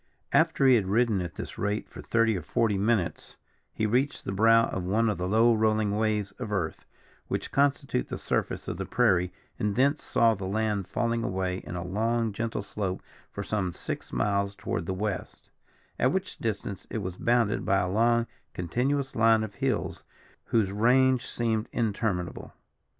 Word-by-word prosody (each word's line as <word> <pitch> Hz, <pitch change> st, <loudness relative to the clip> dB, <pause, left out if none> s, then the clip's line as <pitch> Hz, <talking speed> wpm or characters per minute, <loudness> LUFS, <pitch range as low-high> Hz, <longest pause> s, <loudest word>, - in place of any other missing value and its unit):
After 135 Hz, -, +3 dB
he 130 Hz, -, +7 dB
had 100 Hz, -4 st, -1 dB
ridden 110 Hz, -1 st, +2 dB
at 85 Hz, -2 st, -5 dB
this -, -, -7 dB
rate 105 Hz, +1 st, -1 dB
for -, -, -10 dB
thirty 115 Hz, -1 st, +2 dB
or 90 Hz, -, -3 dB
forty 105 Hz, +5 st, +1 dB
minutes, 100 Hz, -3 st, 0 dB, 0.4 s
he 110 Hz, -, -1 dB
reached 130 Hz, +7 st, 0 dB
the -, -, -2 dB
brow 115 Hz, +3 st, +5 dB
of 95 Hz, -, -3 dB
one 110 Hz, +5 st, +1 dB
of 95 Hz, -, -5 dB
the 90 Hz, -, -1 dB
low 115 Hz, +4 st, +4 dB
rolling 110 Hz, -2 st, +2 dB
waves 105 Hz, -2 st, 0 dB
of 115 Hz, -4 st, -5 dB
earth, 95 Hz, -6 st, -2 dB, 0.4 s
which -, -, -3 dB
constitute 140 Hz, -, +1 dB
the -, -, -4 dB
surface -, -, -2 dB
of -, -, -3 dB
the -, -, -3 dB
prairie, 95 Hz, -7 st, +2 dB, 0.3 s
and 105 Hz, -1 st, 0 dB
thence 140 Hz, +3 st, +2 dB
saw 115 Hz, -1 st, +3 dB
the 95 Hz, -3 st, -5 dB
land 105 Hz, -1 st, -1 dB
falling 115 Hz, -1 st, -1 dB
away 95 Hz, -2 st, -1 dB
in 90 Hz, -, -7 dB
a 85 Hz, 0 st, -4 dB
long 115 Hz, +3 st, 0 dB
gentle 110 Hz, -1 st, -3 dB
slope 100 Hz, -2 st, -4 dB, 0.3 s
for 100 Hz, -, -5 dB
some 100 Hz, -4 st, -1 dB
six -, -, -6 dB
miles 100 Hz, -1 st, 0 dB
toward 85 Hz, -4 st, -3 dB
the 95 Hz, -, -1 dB
west, 100 Hz, +1 st, -4 dB, 0.5 s
at -, -, +3 dB
which -, -, -3 dB
distance 100 Hz, -4 st, -4 dB
it 110 Hz, -, -3 dB
was 90 Hz, -1 st, -5 dB
bounded 115 Hz, -3 st, +2 dB
by 95 Hz, -, +2 dB
a 90 Hz, -, +1 dB
long 115 Hz, +4 st, +3 dB, 0.3 s
continuous 130 Hz, -, -1 dB
line 115 Hz, -1 st, +4 dB
of 105 Hz, -2 st, -6 dB
hills, 130 Hz, -2 st, -2 dB, 0.4 s
whose 105 Hz, -4 st, +1 dB
range 125 Hz, +4 st, +3 dB
seemed 115 Hz, -2 st, -1 dB
interminable. 100 Hz, -5 st, -2 dB
110 Hz, 175 wpm, -28 LUFS, 95-115 Hz, 0.5 s, he